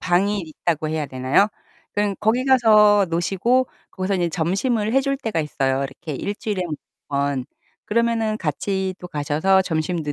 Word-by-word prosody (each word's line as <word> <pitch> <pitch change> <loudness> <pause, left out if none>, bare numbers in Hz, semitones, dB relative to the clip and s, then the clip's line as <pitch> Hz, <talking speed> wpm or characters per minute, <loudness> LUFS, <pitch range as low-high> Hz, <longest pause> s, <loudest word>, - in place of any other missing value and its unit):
방이 195 +3 +1
있다고 160 -1 -2
해야 155 -2 -2
되나요? 130 +9 +2 0.5
그런 205 -1 0
거기 225 +4 +1
가서 215 -6 +5
노시고 195 +10 +1 0.2
거기서 190 +1 -1
인제 175 -2 +1
점심을 205 +7 0
해 270 - +4
줄 275 0 -1
때가 225 - -3
있어요. 135 -3 -1
이렇게 145 +3 -7
1 205 - -2
주일에 205 -3 -3
1 160 - -3 0.3
번. 140 -2 -1 0.4
그러면은 225 -1 +1
같이 190 +3 -2
또 180 - -8
가셔서 160 +5 +2
점심도 160 -2 -2
190 Hz, 320 characters per minute, -22 LUFS, 155-210 Hz, 0.5 s, 가서